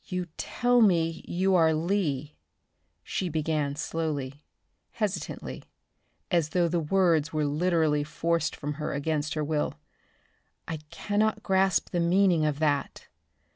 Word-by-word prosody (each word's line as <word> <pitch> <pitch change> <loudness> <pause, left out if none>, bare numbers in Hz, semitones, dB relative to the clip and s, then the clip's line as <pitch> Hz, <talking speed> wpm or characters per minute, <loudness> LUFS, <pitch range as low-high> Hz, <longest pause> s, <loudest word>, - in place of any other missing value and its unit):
"You 180 -1 -3
tell 245 0 +2
me 165 -6 +2
you 190 +2 +1
are 160 -3 +4
Lee," 155 -5 -1 0.7
she 185 - -2
began 155 -2 -1
slowly, 150 -3 -3 0.5
hesitantly, 210 -4 -3 0.7
as 170 -4 +2
though 175 +1 +2
the 170 +1 0
words 165 -2 +2
were 155 -1 0
literally 155 -1 +1
forced 165 +1 -1
from 145 +1 -4
her - - -2
against 150 +1 -1
her 155 - -1
will. 150 0 -1 0.9
"I 165 - -3
cannot 215 +3 0
grasp 190 -1 +2
the 175 - 0
meaning 175 -1 +3
of 150 -2 0
that. 145 -2 -1
165 Hz, 130 wpm, -27 LUFS, 150-185 Hz, 0.9 s, are